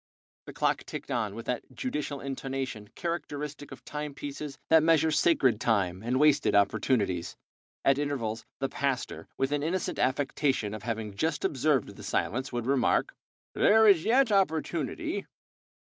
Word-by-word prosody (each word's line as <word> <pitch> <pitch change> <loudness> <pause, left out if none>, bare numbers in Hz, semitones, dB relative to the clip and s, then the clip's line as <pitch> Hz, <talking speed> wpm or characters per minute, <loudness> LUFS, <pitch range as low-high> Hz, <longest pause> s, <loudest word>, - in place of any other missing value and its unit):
The - - -8
clock - - 0
ticked - - -6
on - - -1
with - - -7
that - - -4
judicial 150 - -3
intonation 135 -5 -4
characteristic 150 -4 -4
of - - -11
time 150 -1 -5
pieces 145 0 -6
that 160 0 +7
measure 160 0 +4
sacred 140 -7 +3
time 95 -5 +1
and 125 +3 0
wasted 150 -6 +4
opportunities. 100 -3 +1 0.5
At 135 0 +4
intervals 125 -7 -2 0.2
the 135 - 0
pastor, 135 -2 -2
with 135 +1 0
an 145 -1 0
innocent 175 +5 -2
affectation 130 -4 0
of 110 - -6
having 110 -3 -4
just 160 +8 -1
observed 140 -3 +1
the - - -11
silence, 125 +8 -1
would 120 -2 -3
remark: 135 -1 +2 0.4
"There 220 +1 +5
is 190 -6 +6
yet 245 +1 +3
opportunity. 160 - 0
140 Hz, 145 wpm, -29 LUFS, 120-155 Hz, 0.5 s, that